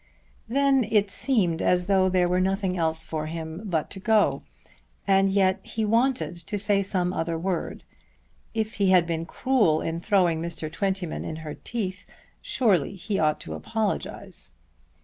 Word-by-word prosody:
Then 270 Hz, +2 st, +3 dB
it 205 Hz, -3 st, +2 dB
seemed 195 Hz, -9 st, +1 dB
as 180 Hz, 0 st, +2 dB
though 190 Hz, -1 st, +3 dB
there 180 Hz, -1 st, +2 dB
were 180 Hz, +1 st, +1 dB
nothing 190 Hz, 0 st, 0 dB
else 160 Hz, -2 st, -1 dB
for 155 Hz, -1 st, -4 dB
him 160 Hz, +1 st, -6 dB
but 165 Hz, -6 st, -2 dB
to 195 Hz, -, -5 dB
go; 215 Hz, +1 st, +2 dB, 0.6 s
and 195 Hz, 0 st, +4 dB
yet 190 Hz, -1 st, +2 dB
he 220 Hz, -1 st, -3 dB
wanted 235 Hz, -3 st, +1 dB
to 170 Hz, +5 st, -5 dB
say 205 Hz, 0 st, +2 dB
some 185 Hz, -2 st, -1 dB
other 165 Hz, -1 st, -2 dB
word. 180 Hz, +1 st, -3 dB, 0.7 s
If 220 Hz, 0 st, -1 dB
he 195 Hz, -, +4 dB
had 180 Hz, -2 st, +5 dB
been 165 Hz, -1 st, -3 dB
cruel 210 Hz, -11 st, +2 dB
in 165 Hz, +1 st, -3 dB
throwing 175 Hz, -4 st, +2 dB
Mr. 165 Hz, -2 st, -4 dB
Twentyman 190 Hz, -1 st, -2 dB
in 160 Hz, -, -5 dB
her 150 Hz, -, -5 dB
teeth, 195 Hz, -6 st, -5 dB, 0.3 s
surely 200 Hz, -, +1 dB
he 195 Hz, +2 st, -3 dB
ought 155 Hz, -1 st, +2 dB
to -, -, -6 dB
apologize. 220 Hz, -2 st, -4 dB
185 Hz, 160 wpm, -26 LUFS, 165-205 Hz, 0.7 s, had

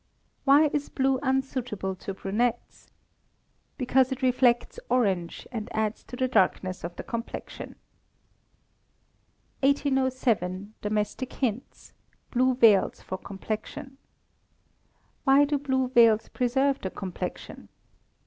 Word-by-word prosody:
Why 290 Hz, +2 st, +6 dB
is 290 Hz, -1 st, -1 dB
blue 265 Hz, -1 st, +1 dB
unsuitable 260 Hz, -7 st, -1 dB
to 195 Hz, +1 st, -6 dB
brunettes? 220 Hz, +5 st, -2 dB, 0.9 s
Because 260 Hz, 0 st, +2 dB
it 265 Hz, +1 st, -4 dB
reflects 250 Hz, -1 st, +2 dB
orange, 195 Hz, -9 st, 0 dB
and 225 Hz, -2 st, -5 dB
adds 220 Hz, 0 st, -1 dB
to -, -, -8 dB
the 255 Hz, +1 st, 0 dB
darkness 185 Hz, -5 st, +1 dB
of 170 Hz, +1 st, -5 dB
the -, -, -6 dB
complexion. 230 Hz, 0 st, -6 dB, 1.8 s
1807. 260 Hz, -8 st, +1 dB
Domestic 210 Hz, +5 st, -2 dB
Hints 245 Hz, -2 st, -4 dB, 0.4 s
(Blue 255 Hz, 0 st, +2 dB
Veils 225 Hz, -6 st, +4 dB
for 185 Hz, -, -5 dB
Complexion). 220 Hz, +7 st, -6 dB, 1.3 s
_Why 280 Hz, +2 st, +6 dB
do 290 Hz, -1 st, 0 dB
blue 260 Hz, -2 st, 0 dB
veils 230 Hz, -3 st, +5 dB
preserve 265 Hz, +2 st, +1 dB
the 190 Hz, -, -3 dB
complexion? 185 Hz, -1 st, -6 dB
250 Hz, 105 wpm, -27 LUFS, 210-265 Hz, 1.8 s, Why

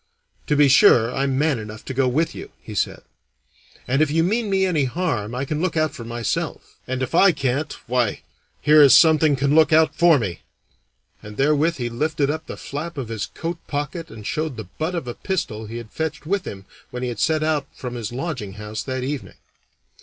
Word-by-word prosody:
"To 150 Hz, -, +2 dB
be 145 Hz, 0 st, +5 dB
sure 125 Hz, -3 st, +5 dB
I'm 135 Hz, -1 st, 0 dB
man 145 Hz, -3 st, +1 dB
enough 110 Hz, 0 st, -9 dB
to 130 Hz, -, -5 dB
go 130 Hz, 0 st, +2 dB
with 155 Hz, +7 st, 0 dB
you," -, -, -8 dB
he -, -, -10 dB
said; -, -, -2 dB, 0.8 s
"and 135 Hz, +4 st, +2 dB
if 155 Hz, -, +3 dB
you 165 Hz, +2 st, +2 dB
mean 215 Hz, +4 st, 0 dB
me 190 Hz, -1 st, +2 dB
any 160 Hz, -7 st, +1 dB
harm 125 Hz, -, -2 dB
I 130 Hz, +2 st, -2 dB
can 150 Hz, +2 st, -3 dB
look 180 Hz, -2 st, -1 dB
out 155 Hz, -1 st, +1 dB
for 120 Hz, -, -8 dB
myself; 115 Hz, -1 st, -4 dB
and 130 Hz, 0 st, -2 dB
if 130 Hz, -, -4 dB
I 185 Hz, +3 st, +6 dB
can't, 140 Hz, 0 st, -1 dB
why, 120 Hz, -3 st, 0 dB, 0.4 s
here 150 Hz, 0 st, +6 dB
is 140 Hz, -2 st, +8 dB
something 155 Hz, -2 st, +5 dB
can 140 Hz, +1 st, +1 dB
look 160 Hz, 0 st, +5 dB
out 160 Hz, 0 st, +4 dB
for 170 Hz, -3 st, +5 dB
me," 95 Hz, -9 st, -4 dB, 0.8 s
and 105 Hz, 0 st, -10 dB
therewith 150 Hz, +4 st, +2 dB
he 125 Hz, -5 st, -3 dB
lifted 145 Hz, +4 st, 0 dB
up 155 Hz, +1 st, -5 dB
the -, -, -7 dB
flap 155 Hz, +3 st, -6 dB
of 130 Hz, -5 st, -4 dB
his 110 Hz, -3 st, -3 dB
coat 165 Hz, +1 st, -5 dB
pocket 150 Hz, +3 st, -4 dB
and 110 Hz, -2 st, -11 dB
showed 155 Hz, -1 st, -2 dB
the 110 Hz, -5 st, -8 dB
butt 160 Hz, +3 st, -1 dB
of 165 Hz, -7 st, -4 dB
a 120 Hz, -, -3 dB
pistol 110 Hz, -, -3 dB
he 115 Hz, +2 st, -6 dB
had 115 Hz, -2 st, -9 dB
fetched 155 Hz, -2 st, -4 dB
with 195 Hz, +3 st, -1 dB
him 95 Hz, -1 st, -7 dB, 0.2 s
when 125 Hz, 0 st, -6 dB
he 125 Hz, -, -1 dB
had 115 Hz, -3 st, -6 dB
set 155 Hz, +7 st, +2 dB
out 155 Hz, -3 st, 0 dB
from 125 Hz, -2 st, -7 dB
his 120 Hz, -3 st, -5 dB
lodging 125 Hz, -, -4 dB
house 105 Hz, +1 st, -6 dB
that 130 Hz, -1 st, -4 dB
evening. 140 Hz, 0 st, -5 dB
140 Hz, 215 wpm, -22 LUFS, 120-160 Hz, 0.8 s, is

